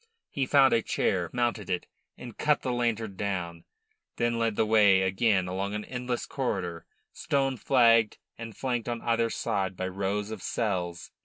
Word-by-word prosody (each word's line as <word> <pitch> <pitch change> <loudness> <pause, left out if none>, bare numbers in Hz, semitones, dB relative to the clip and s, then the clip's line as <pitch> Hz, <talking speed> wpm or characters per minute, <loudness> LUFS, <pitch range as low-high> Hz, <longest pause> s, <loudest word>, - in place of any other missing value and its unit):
He 135 -2 -1
found 135 -1 +5
a 115 - +3
chair, 90 -5 0
mounted 120 -5 -1
it, 90 -1 -1 0.3
and 120 -3 -9
cut 150 -1 +1
the 130 - -1
lantern 115 -4 -1
down, 90 -5 -3 0.5
then 120 0 0
led 115 -2 0
the 110 - +2
way 105 -3 +5
again 95 0 +2
along 100 +3 -3
an 105 - -4
endless 125 -1 -3
corridor, 95 -11 -3 0.3
stone 135 -2 0
flagged 115 -3 +4 0.2
and 115 -2 -9
flanked 120 -3 -2
on 120 -1 -4
either 115 0 +1
side 95 -4 -2
by 95 - -2
rows 100 +2 -2
of 110 -4 -6
cells. 90 -7 -3
110 Hz, 165 wpm, -28 LUFS, 95-120 Hz, 0.5 s, found